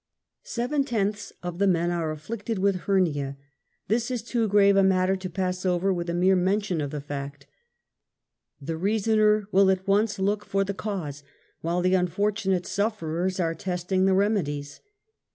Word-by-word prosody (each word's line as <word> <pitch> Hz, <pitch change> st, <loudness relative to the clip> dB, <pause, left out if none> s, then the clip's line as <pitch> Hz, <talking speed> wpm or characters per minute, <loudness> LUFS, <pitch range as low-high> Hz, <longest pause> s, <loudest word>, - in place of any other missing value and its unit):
Seven 265 Hz, +4 st, -1 dB
tenths 210 Hz, -5 st, -2 dB
of 175 Hz, 0 st, -5 dB
the 200 Hz, -, +3 dB
men 175 Hz, -2 st, +2 dB
are 170 Hz, -2 st, -1 dB
afflicted 205 Hz, +8 st, -4 dB
with 190 Hz, -1 st, 0 dB
hernia. 145 Hz, -8 st, +1 dB, 0.5 s
This 230 Hz, +4 st, 0 dB
is 245 Hz, -4 st, -3 dB
too 230 Hz, -1 st, 0 dB
grave 200 Hz, -1 st, +5 dB
a 195 Hz, -, +5 dB
matter 190 Hz, 0 st, +3 dB
to 185 Hz, -1 st, -6 dB
pass 185 Hz, +1 st, -2 dB
over 185 Hz, +1 st, +1 dB
with 175 Hz, -1 st, -3 dB
a 170 Hz, -, -1 dB
mere 185 Hz, +2 st, +4 dB
mention 185 Hz, -1 st, 0 dB
of 145 Hz, -, -2 dB
the 150 Hz, -, -4 dB
fact. 140 Hz, 0 st, -6 dB, 1.1 s
The 150 Hz, +3 st, -4 dB
jrasoner 215 Hz, +1 st, +2 dB
will 195 Hz, 0 st, +5 dB
at 190 Hz, 0 st, 0 dB
once 205 Hz, +2 st, +2 dB
look 200 Hz, +2 st, 0 dB
for 195 Hz, -1 st, 0 dB
the 200 Hz, +1 st, -3 dB
cause, 180 Hz, -9 st, -5 dB, 0.4 s
while 170 Hz, +2 st, -1 dB
the 185 Hz, +1 st, +2 dB
unfortunate 190 Hz, +1 st, 0 dB
sufferers 190 Hz, -3 st, -1 dB
are 165 Hz, -2 st, +1 dB
testing 180 Hz, +2 st, -1 dB
the 190 Hz, -, +3 dB
remedies. 160 Hz, -9 st, -1 dB
190 Hz, 165 wpm, -26 LUFS, 175-205 Hz, 1.1 s, grave